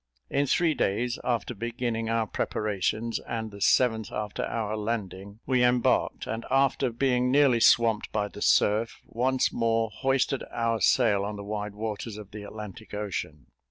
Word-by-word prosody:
In 140 0 +1
three 170 +2 +2
days 120 +1 -1
after 120 -1 -1
beginning 115 0 -3
our 115 -1 +1
preparations, 110 +2 -2
and 110 -1 -5
the 100 0 -11
seventh 110 0 +3
after 105 -1 -3
our 110 -2 -2
landing, 105 -1 -4
we 125 -2 +2
embarked, 125 -1 +2
and 115 +1 -4
after 135 0 +2
being 125 +1 +1
nearly 135 -3 +4
swamped 115 -2 +4
by 105 -1 0
the 100 - -11
surf, 110 +2 +2
once 130 +2 0
more 115 -1 +1
hoisted 135 +2 0
our 115 -1 -1
sail 105 -6 +3
on 105 +1 -4
the 100 - -7
wide 105 0 -4
waters 110 0 -4
of 105 -2 -10
the 105 0 -8
Atlantic 105 0 -9
Ocean. 85 -9 -4
115 Hz, 160 wpm, -27 LUFS, 105-125 Hz, -, nearly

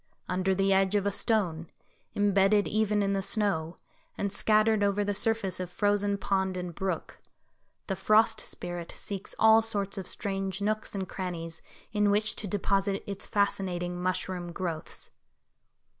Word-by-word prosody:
Under 185 +1 +1
the 195 +1 +3
edge 190 +1 +3
of 200 -1 +2
a 200 - +2
stone, 180 -7 0 0.5
imbedded 205 0 +3
even 210 -1 +1
in 200 0 +1
the 195 - 0
snow, 190 -6 0 0.4
and 200 -1 -2
scattered 215 +1 +3
over 200 0 +2
the 205 0 -1
surface 205 -3 0
of 180 -1 -4
frozen 205 +1 +1
pond 190 -1 0
and 180 -1 -4
brook. 185 -1 -4 0.7
The 195 - -2
Frost 215 +3 +4
Spirit 175 -1 -5
seeks 195 -2 -5
all 220 0 +7
sorts 200 -2 -1
of 185 - -6
strange 195 -2 -3
nooks 215 +1 -1
and 190 -1 -3
crannies 165 -4 -5 0.3
in 210 -1 +2
which 210 +2 +2
to 210 - -3
deposit 195 0 0
its 200 -1 -5
fascinating 180 -3 -1
mushroom 180 -1 -2
growths. 170 -3 -4
195 Hz, 150 wpm, -29 LUFS, 185-205 Hz, 0.7 s, all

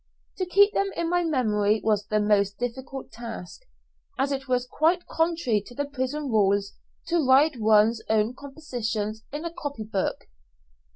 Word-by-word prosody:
To 370 - -1
keep 405 +3 +5
them 395 - +1
in 335 0 -1
my 355 0 +2
memory 215 -9 +1
was 210 -2 +1
the 215 -1 +1
most 200 -1 +2
difficult 260 +2 -5
task, 230 - -8 0.6
as 275 +2 0
it 270 -1 -3
was 250 -1 +1
quite 330 +7 +1
contrary 325 -10 0
to 245 - -12
the 285 - -1
prison 285 +1 -3
rules 200 -1 +2 0.4
to 340 -2 +2
write 270 +2 +4
one's 220 +1 +4
own 220 +2 +2
compositions 230 -7 -4
in 295 +4 -5
a 335 - -4
copy 290 -9 -5
book. 205 -3 -2
250 Hz, 160 wpm, -26 LUFS, 215-300 Hz, 0.6 s, keep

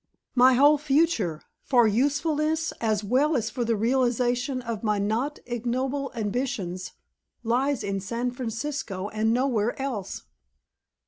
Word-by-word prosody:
My 255 +1 +6
whole 290 +3 +5
future 275 - +1 0.2
for 240 -4 +4
usefulness 305 +7 +1
as 215 -2 +1
well 270 +9 +2
as 225 -4 -1
for 245 - -2
the 230 0 +1
realization 245 +2 +1
of 230 -3 -4
my 210 -1 +1
not 225 +9 -1
ignoble 255 +4 -2
ambitions 210 -5 -3 0.5
lies 255 +4 +1
in 195 -1 -2
San 235 +5 -2
Francisco 230 -4 -4
and 220 +1 0
nowhere 240 -2 0
else?" 245 -8 -4
245 Hz, 125 wpm, -26 LUFS, 220-275 Hz, 0.5 s, My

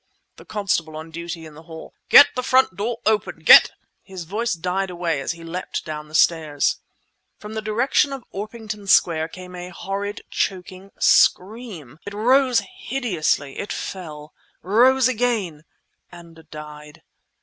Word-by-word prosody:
(the - - -14
constable 185 -7 -2
on 160 +1 -9
duty 170 0 -7
in 155 - -12
the 155 - -13
hall)—"Get 165 - +4
the 250 - -2
front 255 -5 +2
door 225 +4 -3
open! 215 -1 0
Get..." - - +9 0.3
His 190 -3 -9
voice 215 +7 -2
died 180 +3 -2
away 170 -5 -2
as 140 - -3
he 165 0 -13
leapt 175 +2 -5
down 150 -2 -6
the 155 - -10
stairs. 155 -4 +2 0.6
From 210 +1 -10
the 220 - -3
direction 240 +6 +1
of 270 -3 -6
Orpington 210 0 -7
Square 160 -4 +3
came 180 +2 -11
a 180 0 -7
horrid, 200 +3 -5
choking 185 +1 -3
scream. 185 - +1
It 205 0 -8
rose 250 +2 +3 0.2
hideously; 185 - -2
it 200 - -5
fell, 155 -5 -7 0.3
rose 245 +6 +4
again—and 175 -7 -5
died. 150 -1 -11
185 Hz, 140 wpm, -22 LUFS, 160-215 Hz, 0.6 s, Get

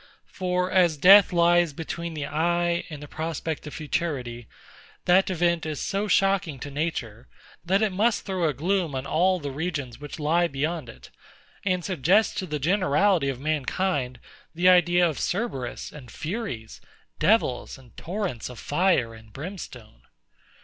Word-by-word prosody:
For 180 -1 -2
as 175 -5 +3
death 195 +6 +8
lies 175 -2 +3
between 165 +2 -5
the 150 -2 -3
eye 170 +3 0
and 150 -2 -8
the - - -8
prospect 160 -1 -4
of 150 - -8
futurity, 130 -7 -3 0.6
that 185 +2 +4
event 170 -2 +1
is 155 -2 -4
so 200 +2 -1
shocking 195 -7 +2
to 145 - -6
Nature, 130 -7 -4 0.4
that 195 +4 +2
it 215 - +1
must 215 +4 +1
throw 185 -3 -1
a - - -1
gloom 170 0 0
on 130 +1 -3
all 180 +6 +2
the 145 -3 -5
regions 145 -5 -4
which 145 -1 -7
lie 165 +4 +2
beyond 150 -1 -3
it; - - -13 0.5
and 185 -3 0
suggest 190 +4 +2
to 185 - -4
the 150 -2 -2
generality 180 0 +2
of 130 -2 -4
mankind 145 -2 -1 0.4
the 175 +2 +2
idea 175 -1 +5
of 155 - -4
CERBERUS 180 - -3
and 135 -5 -12
FURIES; 155 - -5 0.4
devils, 200 - +1
and 130 -3 -19
torrents 180 - -4
of 125 - -10
fire 145 - +1
and 110 -1 -15
brimstone. 150 - -9
165 Hz, 155 wpm, -25 LUFS, 140-185 Hz, 0.6 s, death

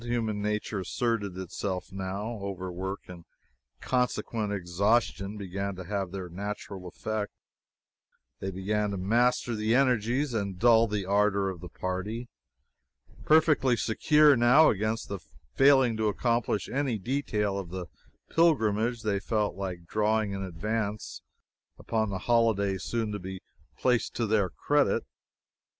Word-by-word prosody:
Human 115 -3 -1
nature 105 0 -2
asserted 100 -1 -1
itself, 95 0 -4
now. 100 +4 -4
Overwork 95 0 -4
and 90 -2 -10 0.6
consequent 120 -4 -1
exhaustion 100 +2 0
began 100 0 -4
to 95 - -7
have 100 0 -2
their 95 -2 -5
natural 95 0 -6
effect. 110 +3 -3 1.1
They 95 - -3
began 105 +3 -1
to 100 - -3
master 120 +5 +2
the 110 +1 +1
energies 125 +1 +2
and 100 -4 -2
dull 115 +2 +5
the 105 -2 -2
ardor 100 0 +2
of 90 -3 -10
the 90 - -8
party. 105 +6 -4 1.0
Perfectly 150 -5 +4
secure 150 +7 +4
now, 125 +6 +6
against 110 +2 -2 0.4
failing 135 -4 +5
to 110 -1 +1
accomplish 115 0 0
any 135 -4 -1
detail 105 -4 -1
of 90 -3 -7
the 90 0 -5 0.5
pilgrimage, 120 -8 +2
they 100 -2 0
felt 105 0 0
like 90 -2 -5
drawing 110 +2 +1
in 100 0 -4
advance 105 +4 -3 0.6
upon 110 -2 -1
the 95 - -2
holiday 110 -5 +2
soon 115 0 -2
to 105 - -4
be 95 0 -7 0.4
placed 125 -2 +1
to 115 - 0
their 105 -3 +2
credit. 145 +9 +1
105 Hz, 130 wpm, -28 LUFS, 95-115 Hz, 1.1 s, now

